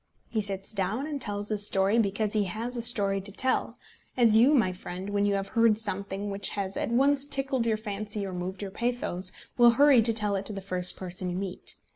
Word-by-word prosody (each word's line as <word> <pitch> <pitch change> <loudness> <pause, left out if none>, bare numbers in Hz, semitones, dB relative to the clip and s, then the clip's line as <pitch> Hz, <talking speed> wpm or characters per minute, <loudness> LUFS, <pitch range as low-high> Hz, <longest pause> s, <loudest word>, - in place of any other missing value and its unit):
He 220 - 0
sits 195 -1 -3
down 210 +6 -2
and 295 -3 -5
tells 205 -2 -2
his 210 -2 +1
story 195 +4 +2
because 205 0 0
he 210 -2 +2
has 225 +7 -4
a 235 - -2
story 200 -4 +1
to 200 +1 -6
tell; 255 +6 0 0.4
as 230 -3 +5
you, 250 +7 +6
my 200 -8 +2
friend, 185 +2 -7
when 205 0 +1
you 200 - +1
have 195 0 -3
heard 230 -2 +3
something 200 -1 -2
which 200 0 -1
has 195 -1 -3
at - - -2
once 275 +4 +3
tickled 270 -4 -1
your 220 -1 +1
fancy 210 -1 -4
or 190 - -6
moved 185 +2 -5
your 195 - -5
pathos, 205 -6 -2 0.3
will 240 -1 +7
hurry 285 -4 +6
to 230 +1 +3
tell 210 -2 +1
it 195 0 -2
to 215 - -3
the 195 - -5
first 185 -2 -1
person 185 0 -4
you 175 - -3
meet. 190 -1 -4
205 Hz, 225 wpm, -28 LUFS, 195-230 Hz, 0.4 s, will